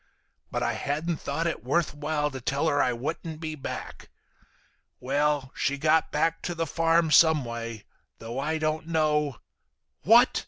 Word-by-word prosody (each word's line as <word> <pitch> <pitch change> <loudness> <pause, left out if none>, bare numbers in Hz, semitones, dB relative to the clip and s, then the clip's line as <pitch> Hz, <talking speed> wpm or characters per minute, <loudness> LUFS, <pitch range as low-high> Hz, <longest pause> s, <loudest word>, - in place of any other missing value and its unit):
But - - -2
I - - 0
hadn't 155 +4 -2
thought 155 +4 -3
it 170 - -2
worth 155 +6 +1
while 150 0 -1
to 130 -1 -7
tell 140 +6 0
her 145 -2 +2
I 125 - +2
wouldn't 155 +6 -4
be 160 -1 -4
back. 145 -3 -7 0.9
Well, 140 0 0
she 140 - 0
got 155 +2 +2
back 165 +2 0
to 175 - -4
the 165 0 -1
farm 165 +1 +2
some 155 -2 +5
way, 115 -2 -6 0.3
though 115 +3 -6
I 155 +3 -1
don't 155 0 -2
know—" 150 -4 +1 0.6
"What!" - - +5
150 Hz, 160 wpm, -27 LUFS, 140-160 Hz, 0.9 s, some